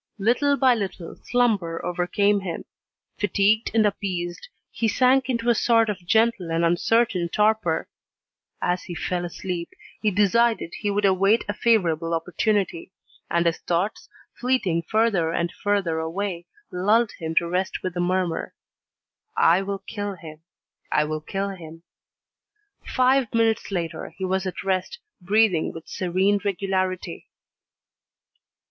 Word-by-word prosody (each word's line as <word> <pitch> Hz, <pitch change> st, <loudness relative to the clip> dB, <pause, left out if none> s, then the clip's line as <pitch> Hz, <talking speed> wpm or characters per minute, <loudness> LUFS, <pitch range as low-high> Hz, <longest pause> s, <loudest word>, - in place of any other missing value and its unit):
Little 250 Hz, +7 st, +2 dB
by 260 Hz, -1 st, +5 dB
little 195 Hz, -6 st, -5 dB
slumber 205 Hz, -9 st, 0 dB
overcame 200 Hz, +4 st, +1 dB
him. 180 Hz, -4 st, -5 dB, 0.5 s
Fatigued 205 Hz, +2 st, +2 dB
and 220 Hz, -1 st, +4 dB
appeased, 185 Hz, -, -3 dB, 0.2 s
he 230 Hz, -, -1 dB
sank 255 Hz, +4 st, +3 dB
into 235 Hz, -2 st, -1 dB
a 240 Hz, -, +6 dB
sort 230 Hz, -1 st, +3 dB
of 185 Hz, -4 st, -9 dB
gentle 220 Hz, -3 st, +2 dB
and 165 Hz, +1 st, +1 dB
uncertain 175 Hz, +1 st, +2 dB
torpor. 210 Hz, -5 st, +1 dB, 0.8 s
As 180 Hz, +1 st, 0 dB
he 175 Hz, -, -6 dB
fell 175 Hz, +3 st, -2 dB
asleep, 175 Hz, 0 st, -5 dB, 0.3 s
he 215 Hz, -, +3 dB
decided 210 Hz, 0 st, +2 dB
he 205 Hz, -, -1 dB
would 205 Hz, 0 st, +1 dB
await 195 Hz, +3 st, +3 dB
a 205 Hz, -, -1 dB
favourable 170 Hz, -8 st, +1 dB
opportunity, 185 Hz, +1 st, -1 dB, 0.4 s
and 170 Hz, 0 st, +1 dB
his 165 Hz, -1 st, +1 dB
thoughts, 180 Hz, +5 st, -2 dB, 0.2 s
fleeting 245 Hz, -10 st, 0 dB
further 215 Hz, -7 st, +2 dB
and 170 Hz, 0 st, -1 dB
further 195 Hz, -6 st, -1 dB
away, 175 Hz, +2 st, -3 dB, 0.2 s
lulled 215 Hz, +6 st, +2 dB
him 160 Hz, -1 st, -4 dB
to 170 Hz, -, +3 dB
rest 180 Hz, +2 st, -2 dB
with 185 Hz, -, -2 dB
the 175 Hz, -, -4 dB
murmur: 180 Hz, -1 st, -1 dB, 0.8 s
"I 170 Hz, +3 st, +5 dB
will 195 Hz, 0 st, -4 dB
kill 205 Hz, -2 st, -4 dB
him, 155 Hz, -3 st, -11 dB, 0.5 s
I 150 Hz, -, +3 dB
will 155 Hz, 0 st, -3 dB
kill 195 Hz, +5 st, -3 dB
him." 165 Hz, -3 st, -10 dB, 1.0 s
Five 255 Hz, -2 st, +2 dB
minutes 225 Hz, -1 st, +2 dB
later, 170 Hz, -4 st, -3 dB
he 190 Hz, -, -3 dB
was 190 Hz, +1 st, -1 dB
at 185 Hz, -, -5 dB
rest, 190 Hz, -, -1 dB, 0.2 s
breathing 195 Hz, -2 st, +2 dB
with 165 Hz, 0 st, -10 dB
serene 190 Hz, +3 st, +1 dB
regularity. 190 Hz, -2 st, -2 dB
190 Hz, 135 wpm, -24 LUFS, 175-220 Hz, 1.0 s, a